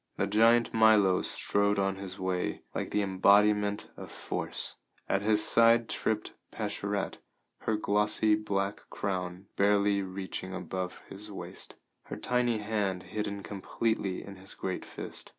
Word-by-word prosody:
The - - +1
giant 115 +3 +4
Milo 110 -4 +5
strode 100 0 +1
on 95 0 0
his 95 -1 -6
way 95 -1 -2
like - - -3
the 105 - +1
embodiment 105 +2 +3
of - - -9
force; - - -3 0.3
at 95 - +1
his 105 0 +3
side 115 0 +5
tripped 110 -1 -1 0.2
Pascherette, - - -3 0.4
her 110 - 0
glossy 105 +1 +2
black 100 -1 -1
crown 90 -1 -3
barely 100 0 +3
reaching 95 0 -5
above 95 -1 -5
his 105 +2 -9
waist, 100 - -7 0.3
her - - -6
tiny 125 -2 +1
hand 105 -4 -1
hidden 100 -2 -3
completely 100 -1 -2
in 100 -1 -10
his 95 +1 -11
great 95 -1 -4
fist. - - -8
100 Hz, 135 wpm, -30 LUFS, 95-105 Hz, 0.4 s, Milo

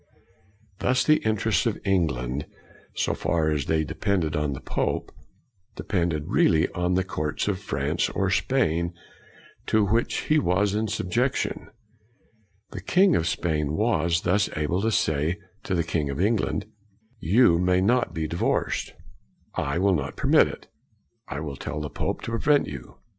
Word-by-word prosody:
Thus 130 +1 +2
the 155 0 +5
interests 110 -2 +1
of 110 - -1
England, 75 -8 0 0.5
so - - 0
far 80 -2 0
as 75 -3 -1
they 80 -1 +1
depended 80 +1 -1
on 75 -1 0
the 65 - -6
pope, 65 - -2 0.6
depended 85 -5 -1
really 80 +1 +3
on 90 +1 -1
the 95 - +2
courts 75 -4 -3
of 100 -3 0
France 75 -3 -1
or 95 -1 -1
Spain 85 -8 +1 0.7
to 110 -1 +3
which 115 +4 0
he 155 0 +2
was 100 -2 +1
in 110 +1 0
subjection. 110 +6 -1 1.0
The - - -6
king 185 -1 +4
of 80 - +1
Spain 75 -3 -1
was 85 -5 +1
thus 100 +3 +1
able 75 +5 0
to 110 +2 +1
say 80 -2 +1 0.3
to 95 - -1
the 85 - +1
king 80 -3 -1
of 70 - -4
England, 105 +3 0 0.3
" 110 +1 -37 0.2
You 90 -10 +6
may 90 0 +3
not 120 +6 +2
be 80 -1 -3
divorced. 85 +3 -1 0.6
I 70 +3 -1
will 95 +2 +3
not 70 -5 -2
permit - - +4
it. - - -9 0.6
I 70 - -5
will 70 -3 -5
tell 75 - -5
the 75 -1 -5
pope - - -3
to - - -4
prevent 140 +6 +3
you.'' 65 -4 -9
90 Hz, 160 wpm, -25 LUFS, 75-105 Hz, 1.0 s, You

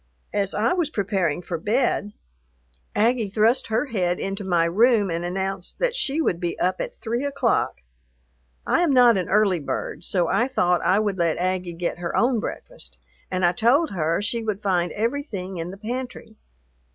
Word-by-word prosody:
As 200 -2 0
I 220 +3 +2
was 345 -5 0
preparing 190 - -1
for 170 -2 -4
bed, 210 0 0 0.8
Aggie 225 -1 +2
thrust 220 +5 +2
her 225 +5 0
head 180 -9 -1
into 195 +1 -3
my 175 -3 +2
room 210 +2 +3
and 165 +1 -2
announced 190 +1 -3
that - - 0
she 300 - +1
would 180 - +1
be 175 -2 -3
up 185 +1 0
at - - -5
three 235 +4 -3
o'clock. 285 -1 0 0.8
I - - +2
am 335 -5 +3
not 245 -3 +6
an 185 -2 -2
early 200 -2 +3
bird, 150 - -4
so 175 -1 +1
I 240 - +2
thought 180 -9 +1
I 190 - +3
would 205 -3 0
let 170 -2 +1
Aggie 180 -1 -1
get 170 +1 -3
her 170 -1 -2
own 240 -1 +3
breakfast, - - -6 0.3
and 185 -1 0
I 175 - +5
told 250 - +2
her 170 +1 0
she 230 +2 -1
would 215 -2 -3
find 180 -3 +1
everything 215 - -3
in 165 +1 -4
the 190 - -8
pantry. 235 0 -6
200 Hz, 180 wpm, -24 LUFS, 180-235 Hz, 0.8 s, not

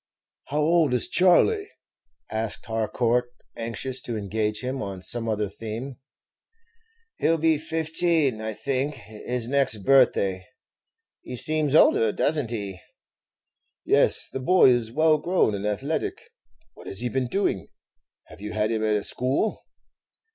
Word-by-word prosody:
"How 150 +2 -1
old 155 -4 +3
is 120 - +1
Charley?" 395 - +3 0.6
asked 110 -1 -3
Harcourt, 115 +2 0 0.3
anxious 120 +3 -5
to 120 -2 -4
engage 105 +1 -2
him 130 +1 -4
on 95 -2 -6
some 115 +1 -3
other 105 -1 -1
theme. 115 +6 -7 1.2
"He - - +1
'll 165 - +3
be 160 -1 +2
fifteen, 160 -5 +1
I 110 0 -4
think, 140 +3 -2
his 115 +1 -5
next 125 -7 +1
birthday; 100 -9 +3 0.7
he 125 - -8
seems 155 +3 0
older, 115 -7 +5
does 150 +8 +1
n't 125 -6 -3
he?" 100 -5 -5 1.1
"Yes, - - +3
the - - -6
boy 180 +2 +5
is 120 -2 0
well 155 +3 +3
grown 175 - +1
and 100 +1 -3
athletic. 155 - -2 0.6
What - - -14
has 95 - -3
he 125 - -1
been 130 +1 -1
doing 155 - -1 0.6
have - - -15
you 105 0 -6
had 105 +1 0
him 110 -1 -1
at 110 -1 +2
a 105 - -1
school?" 135 - -1
125 Hz, 145 wpm, -25 LUFS, 110-150 Hz, 1.2 s, older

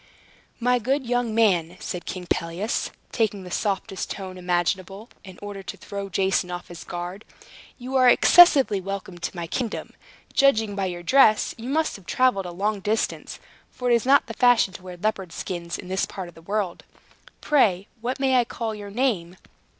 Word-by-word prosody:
"My 250 +1 +2
good 265 +4 0
young 240 -2 0
man," 180 -6 +2
said 180 - -6
King 185 -1 -5
Pelias, 170 +8 -1 0.2
taking 210 -4 0
the 180 - -10
softest 195 -1 -2
tone 190 -2 -6
imaginable, 185 +4 -2
in 185 -2 -12
order 205 -1 -6
to 195 +1 -8
throw 200 +2 -6
Jason 190 0 +1
off 175 0 -6
his 175 -1 -9
guard, 175 +4 -6 0.5
"you 255 +1 -6
are 255 -1 +6
excessively 275 - +6
welcome 190 -2 -6
to 170 - -4
my 170 -1 -4
kingdom. 230 +6 -4 0.4
Judging 225 -7 +3
by 195 -1 -1
your 175 -1 -6
dress, 215 0 +4
you 235 +2 -7
must 310 +3 0
have 195 - -19
traveled 250 -8 +2
a - - -6
long 205 +4 -1
distance, 215 +3 -2 0.3
for 250 -1 -2
it - - +6
is 235 +1 +2
not 280 +1 +5
the 225 - -7
fashion 245 -5 +4
to 185 - -10
wear 180 -1 -9
leopard 195 -2 -2
skins 170 0 -5
in - - -9
this 190 +1 -1
part 190 -2 -7
of 175 - -13
the 165 - -15
world. 195 0 -3 0.6
Pray 200 -10 +2
what 250 +4 -3
may 265 -1 +3
I - - +4
call 230 -1 -4
your 205 -1 -8
name? 200 -7 -1
200 Hz, 185 wpm, -24 LUFS, 180-240 Hz, 0.6 s, are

